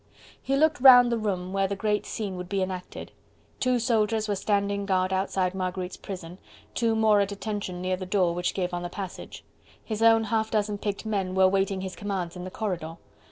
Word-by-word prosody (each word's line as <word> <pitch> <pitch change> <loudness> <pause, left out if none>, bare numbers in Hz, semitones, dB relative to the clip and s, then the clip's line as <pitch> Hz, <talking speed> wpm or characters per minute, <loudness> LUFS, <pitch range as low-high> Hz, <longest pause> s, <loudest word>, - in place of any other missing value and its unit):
He 270 - 0
looked 305 -1 +2
round 245 -2 +9
the 235 - +1
room 185 -3 -2
where 195 0 +1
the 200 - -3
great 210 +1 -1
scene 205 -4 -4
would 180 0 -7
be 195 -1 0
enacted: 185 -1 -6 0.5
two 255 -1 +2
soldiers 225 -2 +1
were 205 - 0
standing 200 0 -1
guard 185 -1 +1
outside 190 -1 0
Marguerite's 185 -1 -3
prison, 180 -2 -8 0.3
two 230 -2 +1
more 215 -2 +4
at 200 0 -1
attention 200 -3 -4
near 185 0 0
the 185 0 -6
door 185 -3 +2
which 175 +1 -2
gave 180 -2 -2
on 175 - -2
the 175 - -4
passage: 190 0 -8 0.4
his 215 -1 -4
own 225 0 +6
half 220 0 0
dozen 210 -2 -1
picked 205 +1 -3
men 195 -4 -2
were 190 0 +6
waiting 195 0 0
his 190 -1 -5
commands 190 -4 -4
in 180 0 -7
the - - -5
corridor. 175 -6 -4
195 Hz, 205 wpm, -26 LUFS, 185-215 Hz, 0.5 s, round